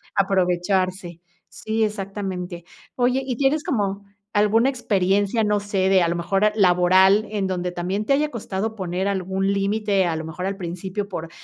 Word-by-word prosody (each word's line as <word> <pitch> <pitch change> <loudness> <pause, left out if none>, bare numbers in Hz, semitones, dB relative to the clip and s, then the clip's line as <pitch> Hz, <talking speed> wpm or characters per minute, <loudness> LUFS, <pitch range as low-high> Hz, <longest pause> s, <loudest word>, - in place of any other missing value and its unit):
aprovecharse. 185 -2 0 0.3
Sí, 220 +1 -2
exactamente. 190 -4 -4 0.3
Oye, 250 +1 +1
¿y 255 -2 -3
tienes 280 +4 +1
como 200 -5 -1 0.3
alguna 210 +4 +3
experiencia, 205 -3 +1
no 210 -1 +1
sé, 195 -2 0
de 190 -1 +4
a 170 - +2
lo 170 - -1
mejor 195 +5 +1
laboral, 190 +1 +4
en 205 -3 -1
donde 180 -1 -2
también 180 +4 -2
te 275 - -2
haya 295 +2 +2
costado 220 -2 -4
poner 185 -1 -2
algún 195 0 -1
límite, 200 -1 +1
a 165 -2 -1
lo 160 - -5
mejor 165 +3 -5
al 195 0 -3
principio 185 +3 -5
por 165 -4 -6
195 Hz, 165 wpm, -22 LUFS, 180-210 Hz, 0.3 s, de